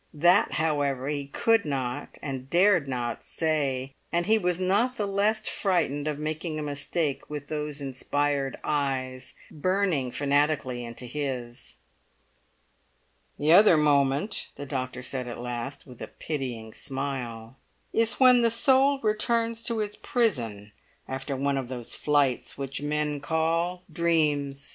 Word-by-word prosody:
That, 175 +6 +4
however, 145 -4 0
he 145 -2 -3
could 225 +9 +2
not 130 -4 -3
and 135 -2 -5
dared 175 -3 +4
not 120 -3 -3
say; 140 -5 -1 0.2
and 170 0 +1
he 220 +1 +4
was 180 -2 0
not 205 +7 +2
the 210 - -1
less 205 +2 +1
frightened 160 -7 0
of 150 -2 -1
making 155 +1 -3
a 155 - -3
mistake 145 +1 -2
with 145 -1 -6
those 150 -1 -3
inspired 140 +1 -1
eyes 130 -3 -2 0.2
burning 180 -4 0
fanatically 140 -2 0
into 120 +1 -7
his. 125 -3 -5 1.6
"The 150 +2 +2
other 185 -1 +8
moment," 145 +5 +2
the 145 - -7
doctor 130 -2 -4
said 125 0 -4
at 120 - -6
last, 120 +3 -5
with 125 -3 -13
a - - -5
pitying 125 -7 -5
smile, 130 -4 -4 0.4
"is 230 0 +3
when 250 -2 +7
the 230 - +4
soul 265 +4 +4
returns 230 +2 +1
to 230 -2 -1
its 210 -1 -4
prison 115 - 0 0.4
after 135 +1 -4
one 140 +1 0
of 130 - -5
those 125 -2 -5
flights 145 -4 +1
which 135 0 -3
men 150 0 -1
call 165 +4 0
dreams. 150 -4 +1
145 Hz, 140 wpm, -27 LUFS, 135-175 Hz, 1.6 s, other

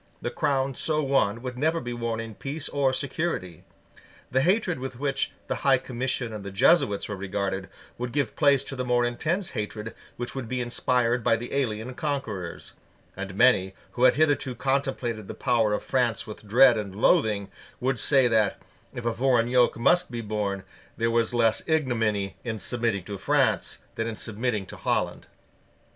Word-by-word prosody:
The - - -3
crown 135 -1 0
so 155 +3 -1
won 120 -5 +1
would 125 -1 -5
never 160 +3 +2
be 120 -3 -5
worn 115 -1 -2
in 115 -1 -6
peace 145 +7 -5
or 140 -2 +1
security: 130 - -3 0.7
The 130 - +3
hatred 180 - +2
with 130 -1 -6
which 140 -1 -1
the - - -2
High 135 -1 +4
Commission 125 -1 -3
and 105 -2 -6
the 100 - -5
Jesuits 100 - +3
were 105 - -4
regarded 95 0 -3 0.3
would 125 0 -3
give 140 -5 -1
place 140 -3 +4
to 135 - -6
the 130 - -2
more 120 -1 +2
intense 170 +10 -1
hatred 105 +1 -4 0.2
which 120 0 -4
would 130 -4 -5
be 130 - -1
inspired 120 0 +1
by 115 - +4
the 120 +1 -6
alien 125 -3 -1
conquerors; 130 - -4 0.4
and 95 -1 -6
many, 95 -5 +4 0.2
who 125 - +2
had 125 - +6
hitherto 145 -4 +2
contemplated 130 -5 -1
the - - -6
power 115 -3 +2
of 105 - -1
France 125 -4 0
with 110 -1 -10
dread 120 +1 +6
and 100 -2 -6
loathing, 105 -1 +2 0.3
would 130 -1 0
say 135 -3 +4
that, 110 -4 +2 0.4
if 120 - -5
a 115 - +1
foreign 120 -2 +2
yoke 125 -2 +3
must 175 +10 +3
be 120 -1 -4
borne, 105 -3 -2 0.3
there 115 0 +1
was 115 -1 +2
less 115 -2 +2
ignominy 115 - 0
in 115 -3 -3
submitting 115 -6 -1
to 100 +1 -6
France - - +1
than 115 - -2
in 115 - -3
submitting 110 -1 -2
to - - -10
Holland. - - -1
120 Hz, 180 wpm, -26 LUFS, 110-135 Hz, 0.7 s, had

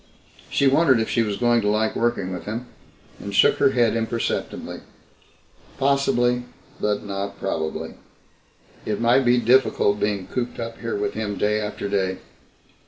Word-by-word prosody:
She 140 - +1
wondered 135 -2 +4
if 110 - -1
she 115 - +2
was 105 -3 -1
going 120 -1 +3
to 105 - -1
like 110 +1 +1
working 110 -6 0
with 90 - -7
him, 115 +4 -4 0.5
and 100 0 -6
shook - - +5
her - - +5
head 120 -4 +2
imperceptibly. 115 0 -3 1.0
Possibly, 130 -3 +2 0.3
but 105 -1 -1
not 100 0 -5
probably. 80 -3 -3 0.9
It 105 - -2
might 120 +3 +3
be 120 0 +4
difficult 120 -4 +3
being 105 -3 -1
cooped 125 -1 -4
up 115 -1 -5
here 115 -1 -3
with 100 0 -2
him 105 -2 -3
day 105 +1 +1
after 105 -1 -4
day. 95 -2 0
110 Hz, 155 wpm, -23 LUFS, 100-120 Hz, 1.0 s, shook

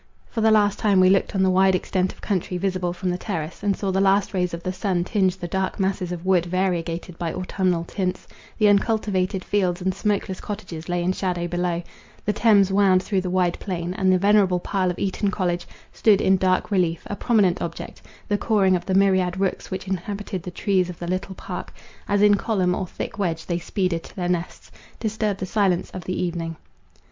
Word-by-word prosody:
For 225 - -2
the 220 - +5
last 205 -2 +3
time 205 -4 +3
we 185 0 +6
looked 195 +1 +1
on 190 - +3
the 190 - +3
wide 190 0 +4
extent 185 +1 0
of - - -18
country 185 -3 -1
visible 185 -1 -1
from 180 +1 -2
the 180 - -3
terrace, 165 -6 -4
and 200 -1 0
saw 195 -2 -1
the 190 +1 +1
last 195 +1 +3
rays 180 -2 0
of 170 0 -6
the 185 - -2
sun 185 -2 0
tinge 190 -1 +1
the 175 - -5
dark 190 +3 -2
masses 190 -2 -1
of 175 0 -5
wood 180 -2 +3
variegated 175 -1 -2
by 170 -2 -2
autumnal 185 -2 -1
tints; 185 +1 -3 0.3
the 215 - +4
uncultivated 200 -3 +1
fields 185 -3 +1
and 190 0 -1
smokeless 195 -1 -1
cottages 180 -6 -7
lay 175 0 0
in 180 - +2
shadow 180 -3 -2
below; 175 0 -1 0.4
the 210 - +1
Thames 205 -3 +4
wound 190 -2 +4
through 195 -1 0
the 185 - -3
wide 180 -1 +1
plain, 180 -2 -3
and 190 0 +2
the 185 - +5
venerable 200 -2 +3
pile 185 0 0
of 180 - -3
Eton 200 +1 -1
college, 175 -3 -1 0.3
stood 210 -3 +4
in 190 - +4
dark 185 +2 +1
relief, 175 -4 +1
a 205 - -4
prominent 200 -6 +2
object; - - -6 0.3
the 205 -1 0
cawing 195 -4 +3
of 175 -1 -4
the 190 - +1
myriad 190 -2 +3
rooks 195 -1 -1
which 190 +1 -5
inhabited 195 0 -4
the 180 - -6
trees 185 0 0
of 175 - -7
the 175 - -6
little 185 +2 -3
park, - - -6 0.4
as 205 0 +2
in 205 0 +7
column 195 -3 +1
or 185 0 -2
thick 200 - -6
wedge 165 -4 -1
they 175 -1 -1
speeded 180 -1 -1
to - - -14
their 180 -2 -2
nests, 175 -1 -3 0.3
disturbed 215 -2 -1
the 185 - -2
silence 185 -2 +1
of 185 0 -8
evening. 170 -2 -2
185 Hz, 210 wpm, -23 LUFS, 180-200 Hz, 0.4 s, in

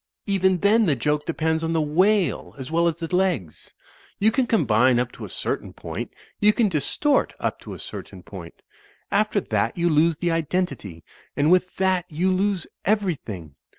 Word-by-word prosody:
Even 190 -2 +2
then 215 +1 +4
the 150 - +3
joke 150 +4 -1
depends 160 -1 0
on 165 0 -1
the 165 - +2
whale 185 +6 +1
as 130 +1 -7
well 170 +1 +3
as 165 - 0
the 170 +2 -3
legs. 175 - -2 0.4
You 215 +2 +3
can 255 +1 +1
combine 130 - +3
up 125 0 0
to - - -9
a - - -10
certain - - -4
point; - - -6 0.3
you 210 +1 +5
can 225 -3 +2
distort 185 - +1
up - - -2
to - - -9
a - - -9
certain - - -9
point; - - -11 0.5
after 215 0 +2
that - - -1
you 170 0 +2
lose 155 +1 +3
the 175 +1 0
identity; 150 - -2 0.3
and 145 +3 +3
with 185 0 +2
that 185 -2 +1
you 175 +4 0
lose 190 -1 0 0.2
everything. 155 - -2
170 Hz, 180 wpm, -23 LUFS, 150-195 Hz, 0.5 s, you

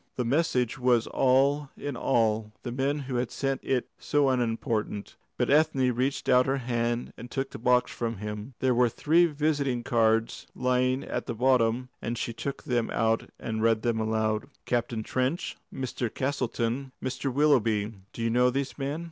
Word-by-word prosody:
The 125 - -1
message 130 -3 +1
was 125 -2 +3
all 135 +2 +2
in 145 -2 -4
all, 110 -3 +1
the 120 - -4
men 135 +4 0
who 130 -2 -3
had 120 -1 -1
sent 135 -1 -2
it 130 -2 0
so 145 -2 +2
unimportant. 115 -4 -1 0.2
But - - +1
Ethne 145 -4 +3
reached 130 +3 -1
out 125 0 +5
her 135 +1 +1
hand 120 -1 -1
and 120 - -9
took 135 +1 -3
the - - -8
box 125 +1 +3
from 115 -2 -3
him. 105 +4 -6
There 130 -1 +3
were 120 0 +4
three 165 +8 +3
visiting 145 -5 0
cards 115 -1 +1
lying 125 +1 +1
at - - -4
the 120 - -3
bottom, 125 0 +2
and 120 +1 -3
she 115 - -3
took 140 +4 -5
them 120 -5 0
out 115 0 0
and 110 -1 -3
read 115 -1 +2
them 115 -2 +1
aloud. 110 -1 0 0.2
"Captain 120 -2 -1
Trench, 130 +9 -1 0.2
Mr. 125 -3 -3
Castleton, 130 -1 -2
Mr. 130 +1 -3
Willoughby. 115 -7 +2 0.2
Do 115 - -5
you 115 - +1
know 125 +1 +4
these 135 +3 -3
men?" 140 +3 -2
125 Hz, 175 wpm, -28 LUFS, 115-135 Hz, 0.2 s, out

